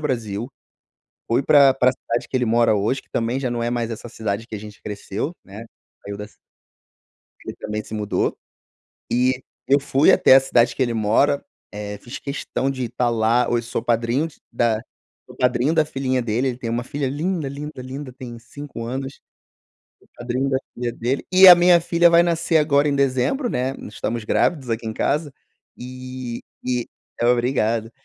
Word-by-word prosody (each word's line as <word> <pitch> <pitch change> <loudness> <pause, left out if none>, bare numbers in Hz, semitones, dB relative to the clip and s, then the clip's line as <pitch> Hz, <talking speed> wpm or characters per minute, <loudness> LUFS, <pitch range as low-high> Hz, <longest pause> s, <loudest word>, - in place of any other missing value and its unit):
Brasil, 115 -5 -3 0.8
fui 120 +4 +1
pra 140 -1 +6
pra 130 -1 +3
cidade 120 -2 -4
que 130 - -1
ele 125 - +1
mora 115 -1 +3
hoje, 105 +7 0
que - - -33
também 120 +3 -1
já 130 - -2
não 120 -1 -2
é 120 - -1
mais 120 -1 -2
essa 115 +1 -7
cidade 110 -1 -4
que - - -8
a - - -4
gente 105 0 -12
cresceu, 105 - -4
né, 105 +4 -10 0.4
saiu 100 0 -6
da 105 - -6
ci - - -25 1.1
ele - - -6
também 105 0 -4
se 110 - -9
mudou. 105 -1 -1 0.8
E 125 +1 +1 0.3
eu 140 +1 +5
fui 140 +1 +4
até 130 - +6
a - - +7
cidade 120 -2 +2
que - - +1
ele 120 -2 0
mora, 115 +7 +2 0.3
eh, 105 0 -6
fiz 120 - -8
questão 140 -1 -3
de 130 -2 -3
estar 120 +1 -1
lá, 115 +2 +2
hoje 120 -1 0
sou - - -3
padrinho 120 +6 0 0.2
da 115 -2 +1 0.5
sou - - -14
padrinho 125 +5 +1
da 155 -1 +4
filhinha 135 -3 -1
dele, 120 +3 0
ele 125 - -4
tem 120 -3 -5
uma 120 +1 -2
filha 140 0 -3
linda, 155 +2 -2
linda, 145 0 -7
linda, 130 +1 -7
tem 120 -2 -9
5 135 -1 -9
anos. 135 +3 -5 1.0
Padrinho 125 +3 -2
da 130 - +2 0.2
filha 120 -1 -3
dele, 125 +4 -2
e 185 0 +9
a 180 - +13
minha 175 0 +5
filha 170 0 +4
vai 170 0 +6
nascer 170 -1 +1
agora 145 -1 +3
em 140 - +1
dezembro, 140 - +1
né, 130 - -1
estamos 115 +2 -4
grávidos 135 +1 +1
aqui 115 0 -2
em 110 - -2
casa, 145 +5 -1 0.4
e 130 -1 -7 0.2
e 125 -2 -1 0.4
obrigado. 120 -2 +1
125 Hz, 180 wpm, -22 LUFS, 115-140 Hz, 1.1 s, a